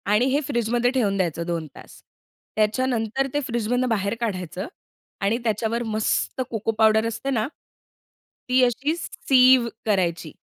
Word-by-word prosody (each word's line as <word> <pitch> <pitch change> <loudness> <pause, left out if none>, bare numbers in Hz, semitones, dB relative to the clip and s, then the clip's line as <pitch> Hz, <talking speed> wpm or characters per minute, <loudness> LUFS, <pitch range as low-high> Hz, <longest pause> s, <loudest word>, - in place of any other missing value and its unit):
आणि 210 +4 +3
हे 285 - +3
फ्रिजमध्ये 240 -2 +1
ठेवून 215 -7 +1
द्यायचं 170 -3 -1
2 165 -2 -3
तास. - - -14 0.5
त्याच्यानंतर 230 +3 0
ते 290 - +1
फ्रिजमधनं 240 +2 0
बाहेर 205 -1 0
काढायचं 190 -3 -3 0.5
आणि 200 +4 +1
त्याच्यावर 225 +1 -1
मस्त 220 +3 -1
कोको 225 0 -1
पावडर 220 0 +4
असते 230 +4 -4
ना, 230 -4 0 1.0
ती 255 0 +4
अशी 260 +6 +1
सीव्ह 255 -6 +4 0.2
करायची 175 -6 0
225 Hz, 130 wpm, -24 LUFS, 205-250 Hz, 1.0 s, पावडर